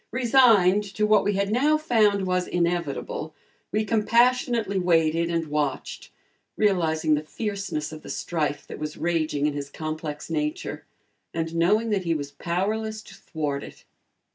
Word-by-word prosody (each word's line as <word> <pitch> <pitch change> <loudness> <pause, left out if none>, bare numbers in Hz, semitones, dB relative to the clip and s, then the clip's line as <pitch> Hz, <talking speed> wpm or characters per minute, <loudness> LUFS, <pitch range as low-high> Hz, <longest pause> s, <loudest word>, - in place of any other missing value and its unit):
Resigned 225 -6 +4
to 210 - +2
what 215 0 +4
we 205 - +1
had 200 +1 0
now 290 +7 +3
found 215 -9 +2
was 180 -1 0
inevitable 170 -3 -2 0.4
we 215 +1 0
compassionately 230 -1 +2
waited 165 -1 +2
and 165 -1 0
watched, 150 -3 -3 0.5
realizing 160 -6 +2
the 150 - +2
fierceness 195 -3 -4
of 155 -1 -9
the - - -11
strife 150 -4 -2
that - - -9
was 150 0 -5
raging 155 -4 0
in 150 - +1
his 140 -1 -5
complex 155 0 -5
nature, 305 +4 -3 0.5
and 165 0 -2
knowing 210 +7 +2
that 195 -3 0
he 165 -1 +1
was 145 -2 -4
powerless 215 +7 -2
to 195 - -14
thwart 150 -7 -4
it. - - -12
180 Hz, 150 wpm, -25 LUFS, 155-215 Hz, 0.5 s, Resigned